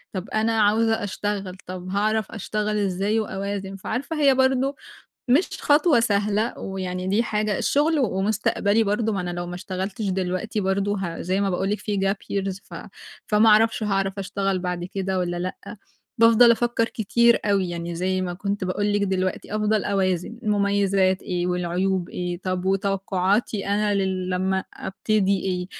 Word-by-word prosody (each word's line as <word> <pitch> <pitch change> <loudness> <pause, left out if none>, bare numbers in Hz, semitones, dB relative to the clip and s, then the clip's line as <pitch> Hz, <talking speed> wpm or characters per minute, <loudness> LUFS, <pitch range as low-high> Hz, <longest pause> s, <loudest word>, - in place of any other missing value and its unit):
طَب، 185 +1 -4
أنا 220 0 +1
عاوزة 225 +1 +2
أشتغل، 200 -2 -3
طَب، 185 0 -6
هاعرف 215 +2 0
أشتغل 210 0 -2
إزاي 200 +2 0
وأوازن؟ 195 -1 -4
فعارفة، 275 - -3
هي 275 -2 +5
برضه 265 +1 +2 0.6
مش 305 +9 +4
خطوة 295 -3 +4
سهلة 210 +1 0
ويعني، 185 -1 -4
دي 210 +4 +2
حاجة، 210 -2 -1
الشغل 300 +2 +2
ومستقبلي 210 -1 +1
برضه، 210 +2 0
ما 195 - -1
أنا 180 0 -3
لو 175 0 -4
ما 175 - -6
اشتغلتش 190 +3 -4
دلوقتي، 185 +3 -2
برضه، 200 +1 0
ه 170 -2 -4
زي 185 +3 0
ما 195 -1 +1
باقول 190 +2 -1
لِك 210 - 0
في 205 -2 -2
gap 195 +1 +1 0.2
years، 195 -1 -2
ف - - -12 0.5
فما 215 +1 +4
أعرفش، 220 +1 +4
هاعرف 195 -1 -1
أشتغل 195 0 -1
بعد 180 -1 -3
كده 190 0 -2
والّا 175 -1 -1
لأ. 185 +5 -6 0.4
بافضل 230 +1 +7
أفكِّر 235 0 +1
كتير 235 +2 +3
أوي 195 -3 +1
يعني، 170 0 -4
زي 185 +2 -1
ما 175 -1 -3
كنت 200 +1 -3
باقول 205 +3 0
لِك 205 - +1
دلوقتي، 190 +1 -2
أفضل 215 0 +1
أوازن، 190 +3 -1
المميزات 200 -2 +2
إيه 180 -1 -2
والعيوب 180 +1 -1
إيه. 175 -1 -4
طَب، 185 -1 -2
وتوقعاتي 195 +1 0
أنا 205 0 +1
ل 190 -1 -1
لمّا 190 +1 0
أبتدي 200 0 0
إيه؟ 180 -1 -2
200 Hz, 160 wpm, -24 LUFS, 185-215 Hz, 0.6 s, بافضل